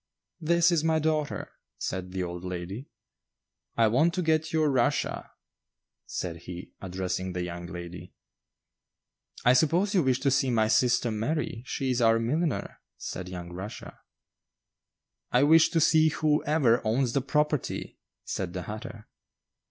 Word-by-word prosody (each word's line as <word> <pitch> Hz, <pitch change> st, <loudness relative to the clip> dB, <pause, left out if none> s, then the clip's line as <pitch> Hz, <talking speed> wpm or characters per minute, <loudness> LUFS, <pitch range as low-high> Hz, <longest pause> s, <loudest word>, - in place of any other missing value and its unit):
"This 170 Hz, +1 st, +3 dB
is 165 Hz, -3 st, +2 dB
my 160 Hz, 0 st, +2 dB
daughter," 155 Hz, -1 st, -1 dB, 0.3 s
said 90 Hz, -1 st, -4 dB
the 95 Hz, 0 st, -2 dB
old 90 Hz, 0 st, -6 dB
lady. 90 Hz, +7 st, -6 dB, 0.9 s
"I 115 Hz, -, +5 dB
want 140 Hz, +10 st, +3 dB
to 180 Hz, -, 0 dB
get 160 Hz, -1 st, +1 dB
your 155 Hz, -1 st, +2 dB
Russia," 125 Hz, -3 st, 0 dB, 0.8 s
said 85 Hz, -2 st, -4 dB
he, 90 Hz, +1 st, -9 dB
addressing 95 Hz, 0 st, -3 dB
the 90 Hz, 0 st, -2 dB
young 85 Hz, 0 st, -6 dB
lady. 85 Hz, 0 st, -8 dB, 1.3 s
"I 125 Hz, -, +7 dB
suppose 170 Hz, -, +2 dB
you 185 Hz, -, +4 dB
wish 130 Hz, -3 st, +1 dB
to 140 Hz, -1 st, +2 dB
see 135 Hz, 0 st, +2 dB
my 110 Hz, -3 st, +2 dB
sister 125 Hz, 0 st, +3 dB
Mary; 115 Hz, +2 st, -2 dB
she 135 Hz, -1 st, -1 dB
is 125 Hz, -1 st, 0 dB
our 115 Hz, -1 st, +5 dB
milliner," 145 Hz, +7 st, -1 dB, 0.2 s
said 90 Hz, 0 st, -6 dB
young 90 Hz, -1 st, -7 dB
Rushia. 95 Hz, +4 st, -8 dB, 1.3 s
"I 125 Hz, +2 st, +4 dB
wish 160 Hz, +2 st, +6 dB
to 165 Hz, -, +1 dB
see 160 Hz, 0 st, +5 dB
whoever 150 Hz, -5 st, +2 dB
owns 120 Hz, +2 st, +1 dB
the 140 Hz, -, +2 dB
property," 150 Hz, +1 st, -1 dB, 0.3 s
said 90 Hz, -3 st, -3 dB
the 90 Hz, -, -4 dB
hatter. 110 Hz, +2 st, -8 dB
125 Hz, 145 wpm, -28 LUFS, 95-155 Hz, 1.3 s, I